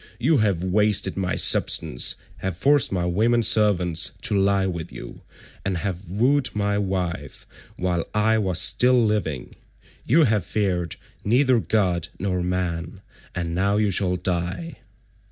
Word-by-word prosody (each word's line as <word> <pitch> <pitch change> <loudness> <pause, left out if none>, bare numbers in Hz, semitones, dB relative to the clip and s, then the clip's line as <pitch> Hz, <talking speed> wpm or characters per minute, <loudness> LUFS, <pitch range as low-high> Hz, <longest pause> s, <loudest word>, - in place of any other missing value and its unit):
You 145 +6 +3
have 100 -5 0
wasted 100 0 +1
my 95 -1 -2
substance,167 60 - +2
have 95 -3 -4
forced 140 +6 +3
my 90 -2 -1
women 115 +7 +1
servants 90 -7 +2
to - - +1
lie 100 0 +2
with 85 -3 -5
you, - - -10 0.4
and 95 -2 -2
have 90 0 -5
wooed 125 +7 +1
my 100 0 0
wife 90 -7 -4 0.3
while 90 -2 -2
I 110 +1 +2
was 95 -5 -1
still 125 +4 +3
living. 85 - -2 0.5
You 160 +7 +4
have 105 - +1
feared 90 -3 -2 0.3
neither 125 +3 +3
God 95 -7 0
nor 95 -2 -2
man, 90 0 -3 0.3
and 85 -2 -3
now 100 +3 +1
you 105 -1 +1
shall 90 -1 +1
die." 90 -1 -3
95 Hz, 140 wpm, -23 LUFS, 90-105 Hz, 0.5 s, You